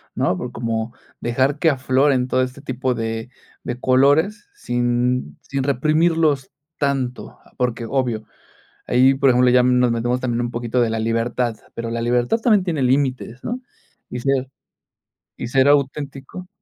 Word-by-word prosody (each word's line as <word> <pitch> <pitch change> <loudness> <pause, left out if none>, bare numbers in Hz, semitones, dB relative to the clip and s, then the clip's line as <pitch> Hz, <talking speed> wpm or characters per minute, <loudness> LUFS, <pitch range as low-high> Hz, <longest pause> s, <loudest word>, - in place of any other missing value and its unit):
¿no?, 95 - +1
por 125 +4 -6
como 115 -1 -3 0.3
dejar 130 +5 0
que 165 - +4
afloren 130 -1 +2
todo 130 - +2
este 130 +2 -4
tipo 130 -2 -2
de 115 0 -4 0.4
de 120 0 -4
colores 145 - +3
sin 120 - -1
sin 140 -1 -3
reprimirlos 155 +1 +2 0.3
tanto. 135 -4 -2 0.2
Porque 120 -2 -1
obvio, 120 -3 -1 0.6
ahí 130 +2 +5
por 135 0 +3
ejemplo, 125 0 +4
ya 125 0 +5
nos 125 -1 +3
metemos 120 +2 -1
también 120 -2 -1
un 120 0 -2
poquito 120 0 -2
de 120 -2 +3
la 110 0 -2
libertad, 115 +1 -1 0.2
pero, 115 0 -4
la 115 0 -2
libertad 120 - +1
también 215 -4 +3
tiene 165 -6 -2
límites, 130 -1 0
¿no?, 245 +2 -3 0.5
y 125 - -5
ser 135 0 0 0.9
y - - -5
ser 130 +2 +3
auténtico. 145 +4 -1
125 Hz, 150 wpm, -21 LUFS, 120-140 Hz, 0.9 s, ahí